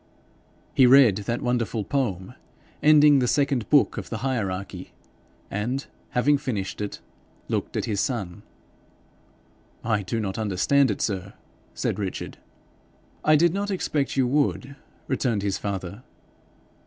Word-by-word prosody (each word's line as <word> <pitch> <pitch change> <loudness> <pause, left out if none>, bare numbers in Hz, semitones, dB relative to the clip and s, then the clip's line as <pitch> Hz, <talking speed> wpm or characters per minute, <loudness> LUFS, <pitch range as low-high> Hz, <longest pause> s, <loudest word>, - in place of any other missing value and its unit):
He 130 - +6
read 125 -6 +7
that 115 +3 -3
wonderful 120 -3 -1
poem 100 -5 -2 0.5
ending 150 -2 +6
the 125 - +1
second 135 -3 0
Book 145 -2 +4
of - - -8
the 115 +3 -4
Hierarchy, 100 -7 -3 0.6
and 120 +7 -2 0.2
having 140 +3 +2
finished 105 -7 -4
it 105 - -5 0.5
looked - - -2
at - - -1
his 100 -2 -1
son. 100 -9 -3 1.4
'I 105 -2 +1
do 100 +4 -3
not 100 -1 -3
understand 110 +7 +2
it, 105 - -2
sir,' 100 -2 -3 0.4
said - - -2
Richard. 95 -3 -5 0.8
'I 155 - +5
did 170 +2 +4
not 200 +1 -2
expect 150 -8 -1
you 130 - +3
would,' 140 0 0 0.3
returned 115 -6 0
his 100 -1 -1
father. 100 +1 -5
120 Hz, 130 wpm, -25 LUFS, 100-140 Hz, 1.4 s, read